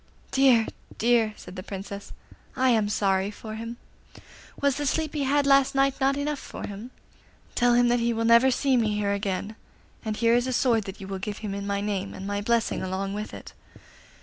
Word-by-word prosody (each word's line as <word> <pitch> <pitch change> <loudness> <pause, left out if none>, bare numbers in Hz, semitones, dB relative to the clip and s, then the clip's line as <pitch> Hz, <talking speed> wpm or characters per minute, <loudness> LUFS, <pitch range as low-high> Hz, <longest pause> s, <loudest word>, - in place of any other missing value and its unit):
'Dear! 260 -4 +5 0.3
dear!' 230 -2 +2
said 180 - -11
the 185 - -5
Princess, 200 +1 -7 0.4
'I 260 0 +3
am 220 -3 +2
sorry 195 -1 +1
for 215 +1 -8
him. 230 +2 -6 0.8
Was 280 -1 +1
the 290 -1 -1
sleep 310 +1 0
he 290 -3 -1
had 285 +1 +2
last 275 -1 +4
night 275 0 +2
not 275 +1 +3
enough 290 0 -2
for - - -7
him? 205 +4 -8 0.6
Tell 245 0 +3
him 245 0 +4
that 240 0 +3
he 235 0 +1
will 230 0 -1
never 235 +3 +6
see 265 +1 +2
me 215 -3 +1
here 205 -1 0
again; 200 +1 -3 0.5
and 215 -1 -3
here 230 0 +3
is 245 +1 +2
a 255 - -1
sword 235 -4 +2
that 195 +2 -8
you 190 - -7
will 195 -1 -4
give 205 +1 -4
him 200 - -3
in 200 0 -4
my 200 0 -1
name, 200 -2 -3
and 190 - -7
my 205 0 -2
blessing 230 +2 0
along 190 +1 -3
with 210 +1 -5
it. - - -10
225 Hz, 210 wpm, -26 LUFS, 200-255 Hz, 0.8 s, never